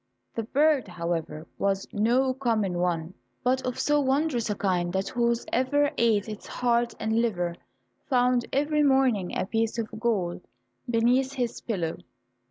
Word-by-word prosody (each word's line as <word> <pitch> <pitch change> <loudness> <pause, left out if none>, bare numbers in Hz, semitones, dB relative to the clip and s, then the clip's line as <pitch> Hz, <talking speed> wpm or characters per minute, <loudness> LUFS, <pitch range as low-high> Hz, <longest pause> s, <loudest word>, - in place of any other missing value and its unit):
The - - -2
bird, 285 +2 +2
however, 170 -3 -4
was 195 -1 0
no 245 +5 +2
common 220 -9 0
one, 175 -1 -1 0.3
but 255 +1 +1
of 250 - -3
so 295 0 +3
wondrous 270 -3 +1
a 210 - 0
kind 180 -3 0
that 190 +1 -1
whosoever 255 +4 +1
ate 225 -3 +2
its 215 -1 -7
heart 240 -1 0
and 220 +1 +1
liver 180 -7 -1 0.6
found 250 -2 +2
every 300 +2 +1
morning 265 -9 +2
a - - 0
piece 225 +3 -1
of 220 -1 -4
gold 195 -8 -1 0.5
beneath 245 +3 +2
his 245 -3 -3
pillow. 175 -8 -2
230 Hz, 145 wpm, -27 LUFS, 195-255 Hz, 0.6 s, so